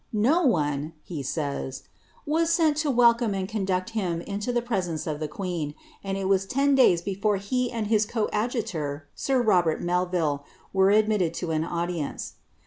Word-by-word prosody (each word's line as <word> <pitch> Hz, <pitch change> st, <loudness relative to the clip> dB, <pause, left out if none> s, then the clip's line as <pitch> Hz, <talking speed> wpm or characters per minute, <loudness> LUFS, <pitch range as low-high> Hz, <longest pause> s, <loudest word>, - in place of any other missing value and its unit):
" -, -, -42 dB, 0.2 s
No 345 Hz, +3 st, +3 dB
one," 150 Hz, -, +1 dB
he 160 Hz, -5 st, -5 dB
says, 140 Hz, -1 st, -3 dB, 0.2 s
" -, -, -32 dB
was 330 Hz, 0 st, +2 dB
sent 315 Hz, -2 st, +3 dB
welcome 235 Hz, -5 st, +3 dB
and 190 Hz, -1 st, -2 dB
eonilucl 190 Hz, -3 st, -1 dB
him 185 Hz, -7 st, -1 dB
into 205 Hz, +6 st, -3 dB
the 240 Hz, -1 st, 0 dB
presence 185 Hz, -9 st, -2 dB
of 150 Hz, -2 st, -3 dB
the 155 Hz, -, -2 dB
queen, 160 Hz, -3 st, -4 dB, 0.3 s
and 195 Hz, -1 st, -2 dB
ii 195 Hz, 0 st, +3 dB
» 195 Hz, -, -9 dB
ten 275 Hz, +1 st, +3 dB
(lays 180 Hz, -10 st, +5 dB
before 200 Hz, +2 st, 0 dB
he 245 Hz, +5 st, -1 dB
and 230 Hz, -3 st, -2 dB
his 215 Hz, 0 st, +2 dB
coadjutor, 210 Hz, -, -2 dB
sir 265 Hz, -2 st, 0 dB
Hobert 180 Hz, -7 st, +3 dB
Melvil, 175 Hz, -5 st, 0 dB, 0.3 s
were 190 Hz, 0 st, +4 dB
adroitt 210 Hz, -5 st, +2 dB
to 175 Hz, -3 st, -3 dB
an 155 Hz, 0 st, +1 dB
audience." 170 Hz, -2 st, -3 dB
195 Hz, 170 wpm, -26 LUFS, 165-230 Hz, 0.3 s, lays